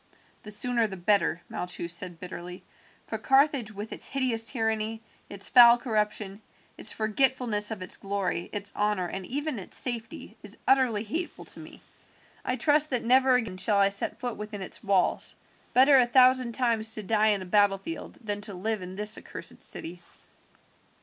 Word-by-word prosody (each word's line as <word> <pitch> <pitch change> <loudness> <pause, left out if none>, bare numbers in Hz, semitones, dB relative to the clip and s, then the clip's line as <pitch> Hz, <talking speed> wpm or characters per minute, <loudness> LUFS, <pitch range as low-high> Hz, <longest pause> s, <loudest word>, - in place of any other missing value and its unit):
"The 210 - -11
sooner 230 +2 +1
the 190 -2 -8
better," 175 -3 0
Malchus 175 -1 -5
said 175 -1 -2
bitterly, 180 0 -9 0.4
"for - - -5
Carthage 270 -4 +2
with 210 +1 -7
its - - +3
hideous 250 -4 +1
tyranny, 220 -2 -1 0.3
its 200 -1 -2
foul 240 -1 +7
corruption, 210 -3 -3 0.3
its 215 - +5
forgetfulness 225 -1 +1
of 215 -5 -5
its 185 - +1
glory, 195 -3 -3
its 200 -1 0
honour, 210 -3 0
and 190 +1 -6
even 290 -2 -3
its 185 - -3
safety, 235 -3 -1
is - - -8
utterly 255 -6 +2
hateful 320 - -5
to - - -12
me. - - -13 0.6
I 250 - -1
trust 300 +2 +2
that 250 -4 -2
never 260 +1 +4
again 225 -7 -2
shall 205 +2 +2
I 200 0 +4
set 200 +3 -1
foot 245 -2 -5
within 210 -2 -7
its 190 - -6
walls. 195 -3 0 0.4
Better 270 +2 +6
a 245 - +3
thousand 255 -1 +4
times 225 -3 +1
to 215 - -5
die 215 +2 +1
in 205 -3 +1
a - - -9
battlefield 205 - -1
than 205 -1 -4
to 205 -2 -6
live 215 +3 -3
in 180 +1 -8
this 210 +2 0
accursed - - -8
city." 175 +2 -3
215 Hz, 170 wpm, -27 LUFS, 200-245 Hz, 0.6 s, foul